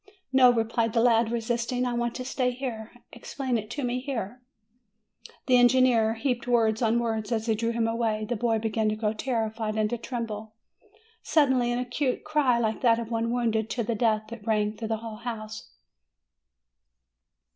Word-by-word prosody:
"No," 260 -1 +7
replied 225 -1 0
the 230 - +2
lad 230 -1 +3
resisting; 235 +2 -1
"I 245 - -1
want 240 0 -1
to 255 - -5
stay 255 -1 0
here. 245 -3 -5 0.2
Explain 255 +2 -3
it 215 0 -8
to 280 +5 -4
me 245 0 -1
here." 250 -3 -5 1.0
The 255 -1 +5
engineer 245 -2 +4
heaped 245 +1 -2
words 225 -2 +2
on 230 0 +2
words, 225 -2 -2
as 225 -1 0
he 225 - +2
drew 230 +2 -1
him 230 -1 0
away; 225 -2 -1
the 240 +3 -2
boy 225 0 +1
began 220 0 0
to 215 - -1
grow 215 0 -1
terrified 220 -2 -2
and 215 -1 0
to 240 - -2
tremble. 220 -3 -5 0.7
Suddenly 260 -6 +2
an 240 - 0
acute 250 +2 -2
cry, 300 -6 +2
like 220 -2 -1
that 230 -2 +4
of 230 0 -5
one 230 0 0
wounded 230 -2 0
to 235 - -2
the 230 - -1
death, 215 -1 +1 0.2
rang 210 -1 0
through 220 +1 -5
the 220 0 -1
whole 220 -1 -6
house. 220 -2 -7
230 Hz, 180 wpm, -27 LUFS, 220-245 Hz, 1.0 s, No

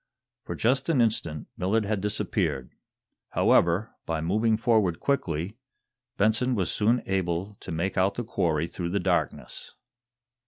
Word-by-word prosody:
For - - -4
just 130 +7 +1
an 155 -6 +3
instant 95 -10 0
Millard 105 +4 +1
had 105 -1 -1
disappeared. 80 -9 -1 0.6
However, 85 +6 +3 0.2
by 80 -1 -1
moving 110 +7 +1
forward 110 -7 +2
quickly, 100 - -1 0.6
Benson 115 +5 +2
was 95 -6 0
soon 115 +4 +2
able 95 +1 -1
to - - -8
make 85 +4 -1
out 95 +2 +2
the 120 - -3
quarry 80 -9 0
through 85 0 -4
the 100 +3 0
darkness. 90 -1 -2
100 Hz, 135 wpm, -27 LUFS, 85-110 Hz, 0.6 s, an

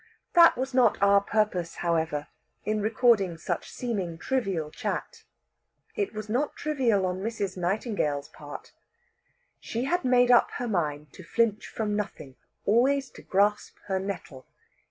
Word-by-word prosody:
That 340 -5 +7
was 265 +1 -3
not 255 -1 +4
our 200 0 +5
purpose, 200 -5 0
however, 160 -3 -1 0.4
in 215 0 0
recording 215 -5 +3
such - - -3
seeming 195 -9 -3
trivial 195 -11 -1
chat. - - -4 0.7
It 410 -3 -1
was 215 0 -5
not 255 +7 -1
trivial 250 -10 +1
on 180 0 -2
Mrs. 205 -3 -3
Nightingale's 180 - -1
part. - - -10 0.9
She 230 +2 -3
had 350 +7 0
made 250 -1 +4
up 240 - +6
her 245 - -3
mind 150 -7 -2
to 185 - -11
flinch 220 +4 0
from 210 -2 -2
nothing, 195 -10 -5 0.3
always 265 +5 +2
to - - -13
grasp 205 +2 +1
her 190 -1 -1
nettle. 175 -9 -6
210 Hz, 140 wpm, -27 LUFS, 180-245 Hz, 0.9 s, That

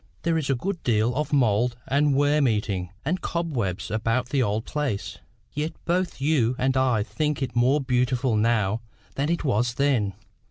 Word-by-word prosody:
There 170 0 +1
is 140 - -3
a 135 - +3
good 175 +7 -3
deal 115 0 +1
of 150 +3 -2
mould 120 -3 +2
and 140 +1 +2
worm 145 0 +3
eating 100 -5 -1 0.2
and 180 +6 -1
cobwebs 125 - -2
about 115 +3 0
the 135 0 +1
old 110 -1 0
place. 145 -9 -3 0.3
Yet 150 +2 -2
both 180 -1 0
you 135 -4 +2
and 130 +1 +1
I 125 -5 +2
think 150 +4 -2
it 125 -2 -4
more 125 +5 +3
beautiful 125 -2 +1
now 110 -1 +1 0.3
than 140 +3 -1
it 170 0 0
was 120 -3 +1
then. 125 -8 +1
130 Hz, 170 wpm, -25 LUFS, 115-145 Hz, 0.3 s, a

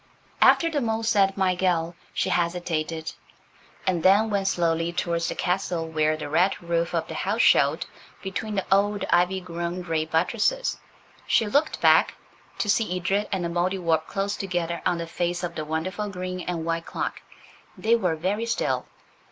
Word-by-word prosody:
After 335 - +6
the 305 -3 -1
mole 225 -1 -1
said 200 -3 +2
"my 190 -1 +2
gell" 175 -2 0 0.2
she - - -1
hesitated, 170 -2 -1 0.7
and 180 -3 +1
then 205 +5 +4
went 195 -1 0
slowly 165 -2 +1
towards 170 -1 -1
the - - -4
castle 180 -2 -1
where 155 -1 +1
the 155 - -5
red 175 +6 +2
roof 170 0 -1
of 165 -1 -1
the - - -6
house - - 0
showed - - +4 0.4
between 205 +2 -4
the 195 - -1
old, 200 0 +2
ivy 180 +2 +3
grown 175 0 -4
grey 160 -2 -1
buttresses. 180 - 0 0.5
She 225 - +3
looked 285 +9 +1
back, - - +5 0.4
to - - -1
see 205 -3 +1
Edred 195 +3 0
and 190 -3 -1
the - - -1
Mouldiwarp 175 -2 0
close 200 +1 -2
together 175 -3 -2
on 180 -1 +1
the 170 - -4
face 175 +1 -2
of 175 -1 -3
the 155 -2 -4
wonderful 185 +7 -3
green 185 -1 -5
and 170 -2 -3
white 165 0 -2
clock. - - -4 0.6
They 225 +2 +3
were 180 -8 0
very 200 +8 -1
still. 230 - -1
180 Hz, 170 wpm, -25 LUFS, 170-195 Hz, 0.7 s, After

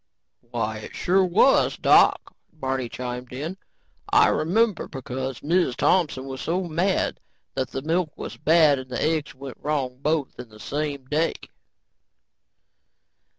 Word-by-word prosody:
"Why 110 -2 -2
it 105 - -10
sure 190 +2 +2
was, 185 +9 +4
Doc," - - +4 0.2
Barney 130 -5 -3
chimed 125 0 -6
in. 155 +9 -5 0.5
"I - - +6
remember, 205 +5 +1
cause 130 -1 -5
Miz 170 -4 +1
Thompson 150 -7 +1
was 135 -1 -6
so 180 +3 -1
mad 175 +3 0 0.3
that 130 -1 -2
the 135 - -5
milk 165 0 -1
was - - -6
bad 155 -3 +4
and 130 0 -9
the 125 - -3
eggs 155 -3 -1
went 135 -1 -9
wrong 135 -4 -2
both 150 -3 -1
in 125 -2 -8
the 110 0 -16
same 145 +1 -3
day." 155 +5 0
145 Hz, 140 wpm, -24 LUFS, 130-165 Hz, 0.5 s, I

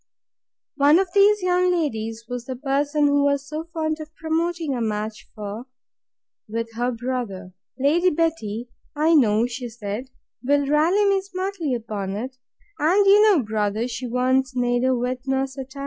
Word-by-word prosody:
One 290 +3 +6
of 380 0 +1
these 405 0 +5
young 360 0 +2
ladies 225 -10 -2
was 245 0 -5
the 260 - -5
person 285 +3 0
she 285 - +3
was 285 -1 +2
so 310 +2 -5
fond 315 -1 -2
of 310 +1 -10
promoting 325 -1 -1
a 245 - -2
match 215 -1 -3
for, 215 +3 -6 0.8
with 230 +1 -3
her 240 +2 -1
brother.—Lady 245 - -1
Betty, 250 - -2 0.3
I 310 +3 +3
know, 225 -6 +4
she 245 0 -5
said, 225 +2 -6 0.3
will 285 +2 +2
rally 320 +8 +3
me 395 -1 +3
smartly 375 -6 -3
upon 210 -4 -4
it; 255 +5 -5 0.4
and 370 +7 +3
you 400 +1 +7
know, 345 -10 +4
brother, 215 +1 -1
she 250 +1 -5
wants 255 +2 +1
neither 245 +1 +1
wit 250 +1 -2
nor 265 0 +1
satire. 265 0 -9
265 Hz, 155 wpm, -23 LUFS, 235-320 Hz, 0.8 s, you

